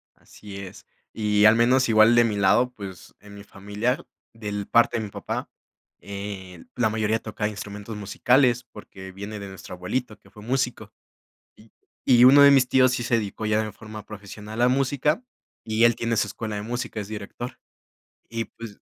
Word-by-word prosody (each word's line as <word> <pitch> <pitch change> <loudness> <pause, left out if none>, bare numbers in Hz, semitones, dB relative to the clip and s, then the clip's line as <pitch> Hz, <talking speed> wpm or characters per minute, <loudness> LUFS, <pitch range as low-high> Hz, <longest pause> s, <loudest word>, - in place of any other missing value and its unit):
Así 100 -2 -12
es. 95 -1 -10 0.3
Y 105 -1 +2
al 110 +1 +7
menos 125 +2 +3
igual 110 +1 +6
de 120 - +6
mi 110 -3 0
lado, 100 +6 +3
pues, 95 -6 -10
en 105 0 -14
mi 100 - -11
familia, 105 +5 -3 0.3
del 105 -3 -5
parte 115 0 +3
de 110 - -3
mi 105 - -6
papá, - - -5 0.5
eh, 100 -3 -8
la 120 -3 +2
mayoría 110 0 0
tocaba 105 -1 -3
instrumentos 105 +1 -7
musicales, 125 +4 +2
porque 95 -2 -11
viene 100 +3 -7
de 100 - -7
nuestro 95 -1 -10
abuelito, 110 +5 -4
que - - -22
fue 105 - -15
músico. 125 +1 -2 0.6
Y 110 0 -20 0.3
y 120 -2 +6
uno 135 +3 +8
de 140 0 +9
mis 135 -2 +5
tíos 130 0 +4
sí 125 -1 -2
se 120 0 +1
dedicó 110 -1 -3
ya 105 0 +2
en 110 - -5
forma 110 -1 -10
profesional 105 +2 -8
a 125 - +5
música, 140 - +1 0.4
y 110 +1 0
él 120 -1 +5
tiene 115 -1 -1
su 105 - +1
escuela 110 0 -5
de 105 - -3
música, 120 -1 -4
es 100 - -5
director. 110 +3 -7 0.7
Y 115 0 -3
pues, 110 -2 -11
110 Hz, 185 wpm, -24 LUFS, 105-120 Hz, 0.7 s, de